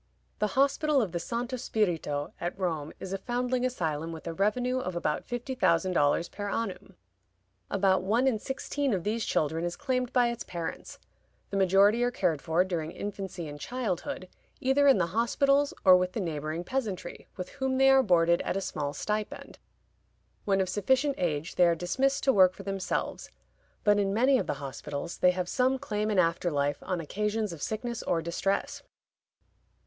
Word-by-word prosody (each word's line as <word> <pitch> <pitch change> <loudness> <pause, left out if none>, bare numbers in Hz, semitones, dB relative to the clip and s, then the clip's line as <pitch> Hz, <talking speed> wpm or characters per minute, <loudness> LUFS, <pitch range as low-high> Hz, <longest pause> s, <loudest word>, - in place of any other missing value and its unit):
The 210 +3 -1
Hospital 280 +2 +3
of 210 -8 0
the 170 - -2
Santo 240 +7 -3
Spirito 170 -11 -1
at 175 +2 -3
Rome 160 -6 -2
is 190 - -6
a 195 - -2
foundling 250 +2 -1
asylum 165 -10 -2
with 160 -1 -9
a 165 - -3
revenue 245 +7 +1
of 185 -8 -4
about 150 -3 -1
fifty 245 +2 -4
thousand 185 -5 +2
dollars 150 +2 +2
per 205 0 -5
annum. 225 -3 -4 0.7
About 190 -1 +2
one 220 +7 +1
in 250 -5 +2
sixteen 270 0 -2
of 180 - -3
these 220 +3 -1
children 160 +2 0
is 175 0 -2
claimed 255 -3 -1
by 245 -2 +3
its 235 0 -4
parents; 170 -2 -6 0.5
the - - -3
majority 195 +4 +4
are 245 - +3
cared 180 - 0
for, 165 +2 +2
during 170 -4 -3
infancy 190 -3 -5
and 145 0 -8
childhood, 185 - -3 0.3
either 275 +2 +3
in 270 - +7
the 180 - +2
hospitals 275 +5 +2
or 185 -1 +9
with 180 0 +1
the - - -2
neighboring 160 -2 -3
peasantry, 205 -6 -4
with 185 - -5
whom 265 -2 -2
they 270 0 +6
are 270 0 +6
boarded 170 -5 +3
at - - -2
a - - +1
small 145 -6 -3
stipend. 210 +4 -4 0.9
When 195 -1 +2
of 190 - 0
sufficient 260 +9 +1
age 160 -2 -1
they 180 - +6
are 170 - +3
dismissed 265 +11 0
to 270 - +4
work 185 -2 +5
for 195 - -9
themselves; 195 -1 -3 0.5
but 205 -1 +4
in 195 0 0
many 260 +3 +4
of - - -3
the 145 - -1
hospitals 140 +3 -6
they 180 - +5
have 180 0 -1
some 255 +6 +2
claim 210 -3 -2
in 210 - 0
after 170 0 +2
life 145 -2 0
on 180 -1 -2
occasions 210 +4 -2
of 160 - -10
sickness 235 +2 -3
or 165 -2 0
distress. 175 +4 -1
195 Hz, 185 wpm, -29 LUFS, 170-245 Hz, 0.9 s, or